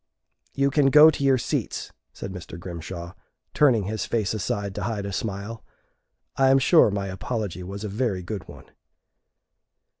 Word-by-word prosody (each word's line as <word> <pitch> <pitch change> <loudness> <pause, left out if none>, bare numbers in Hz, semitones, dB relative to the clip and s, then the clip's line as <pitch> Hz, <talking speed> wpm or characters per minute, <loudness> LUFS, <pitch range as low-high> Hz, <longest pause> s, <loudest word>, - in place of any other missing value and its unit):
"You 140 0 +2
can 145 -1 +3
go 150 +3 +8
to 140 - -4
your 135 -1 +4
seats," - - -3 0.2
said 95 - -7
Mr. 90 -1 -8
Grimshaw, 85 0 -7 0.4
turning 125 -8 +4
his 105 +1 -3
face 110 -3 0
aside 105 -1 -2
to - - -4
hide 105 -4 -3
a 100 - -5
smile. 105 +3 -4 0.7
I 135 -1 +4
am 135 - +6
sure 150 0 +5
my 100 -1 -2
apology 95 -1 -4
was 100 +3 -7
a - - -3
very 105 -3 -2
good 95 -1 -6
one. - - -12
105 Hz, 160 wpm, -25 LUFS, 95-130 Hz, 0.7 s, go